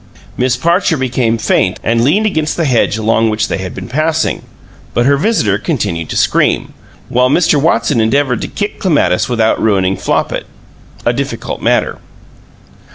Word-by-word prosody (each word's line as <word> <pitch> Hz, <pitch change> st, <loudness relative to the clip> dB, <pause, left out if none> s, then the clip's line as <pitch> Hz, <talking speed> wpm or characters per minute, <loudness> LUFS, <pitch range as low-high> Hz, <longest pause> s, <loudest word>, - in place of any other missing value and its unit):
Miss 125 Hz, 0 st, 0 dB
Parcher 170 Hz, +3 st, +1 dB
became 125 Hz, -3 st, 0 dB
faint 110 Hz, -, 0 dB
and 115 Hz, 0 st, +1 dB
leaned 185 Hz, -, +2 dB
against 155 Hz, -7 st, -1 dB
the 165 Hz, -, 0 dB
hedge 120 Hz, -5 st, +1 dB
along 110 Hz, +1 st, +1 dB
which 110 Hz, 0 st, -1 dB
they -, -, -2 dB
had 95 Hz, -1 st, -6 dB
been 95 Hz, -1 st, -7 dB
passing, 155 Hz, +4 st, -1 dB, 0.5 s
but 120 Hz, -, +2 dB
her 140 Hz, +1 st, +4 dB
visitor 140 Hz, -, +1 dB
continued 85 Hz, -5 st, -2 dB
to -, -, -3 dB
scream, -, -, +1 dB, 0.3 s
while 125 Hz, +1 st, +2 dB
Mr. 150 Hz, -1 st, +3 dB
Watson 145 Hz, -5 st, +2 dB
endeavored 125 Hz, +2 st, +1 dB
to -, -, -3 dB
kick 205 Hz, 0 st, -4 dB
Clematis 145 Hz, -, +1 dB
without 115 Hz, -2 st, +1 dB
ruining 95 Hz, -3 st, +1 dB
Flopit -, -, -2 dB, 0.6 s
a -, -, +2 dB
difficult -, -, -4 dB
matter. -, -, 0 dB
125 Hz, 160 wpm, -14 LUFS, 110-155 Hz, 0.6 s, her